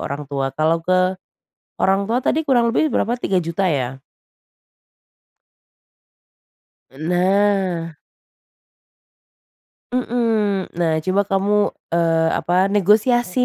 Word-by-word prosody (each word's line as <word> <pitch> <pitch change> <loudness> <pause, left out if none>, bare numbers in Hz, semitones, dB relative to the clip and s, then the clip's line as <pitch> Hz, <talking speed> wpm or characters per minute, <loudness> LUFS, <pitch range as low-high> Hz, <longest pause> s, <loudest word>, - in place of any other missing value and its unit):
orang 145 +1 -5
tua. 135 -1 -3
Kalau 160 +2 +1
ke 185 +2 +1 0.7
orang 195 +1 +2
tua 230 +5 0
tadi 315 +5 0
kurang 240 -4 +2
lebih 300 +5 +1
berapa, 235 +3 0
Rp3.000.000 185 -5 -1
ya? 135 -7 -1 2.9
E 135 - -17
nah. 180 0 0 2.0
Mhm, 225 -6 -1
nah 165 -2 0
coba 190 +2 +1
kamu, 195 +1 0 0.4
eee, 165 -1 +2
apa 175 - -1 0.2
negosiasi 220 +4 +2
190 Hz, 95 wpm, -20 LUFS, 165-220 Hz, 2.9 s, orang